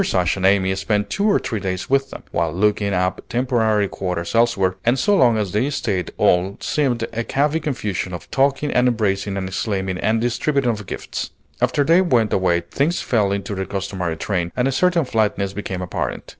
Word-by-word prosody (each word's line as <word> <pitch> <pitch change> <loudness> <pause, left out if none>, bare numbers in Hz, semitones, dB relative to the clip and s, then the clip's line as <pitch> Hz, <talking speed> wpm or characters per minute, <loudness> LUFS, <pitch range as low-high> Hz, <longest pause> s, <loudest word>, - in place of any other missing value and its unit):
Ashe 90 -1 +2
and 95 -1 +2
Amy 95 -1 +3
spent 100 +2 -1
two 205 +2 +1
or 200 - +4
three 110 - -3
days 95 -2 -3
with 135 0 +1
them, - - -9
while 85 -2 0
looking 100 +3 +1
up 90 0 0
temporary 115 -4 +1
quarters 90 -3 -4
elsewhere; 115 -6 +2
and 120 +3 +2
so 205 +10 +3
long 120 - +4
as 105 -4 -1
they 110 +8 +1
stayed 100 - -2
all 90 +3 +2
seemed 130 -6 0
a 115 +1 -1
happy 150 +3 +2
confusion 105 - -3
of 90 - -8
talking 140 +2 +1
and 125 0 +3
embracing 100 -4 0
and 95 -1 -3
exclaiming, 95 -1 -2
and 110 +1 +1
distributing 120 +2 +1
of 105 -4 -6
gifts. - - -5 0.3
After 145 - +2
they 165 +5 +5
went 120 - +2
away 90 -2 +2
things 140 - -1
fell 105 -5 +1
into 100 +2 -3
their 95 -1 -3
customary 95 -3 -3
train, 85 -2 -2
and 125 +1 +1
a - - +1
certain 170 +2 +2
flatness 105 -4 0
became 95 -2 -4
apparent. 90 - -3
105 Hz, 195 wpm, -21 LUFS, 95-125 Hz, 0.3 s, they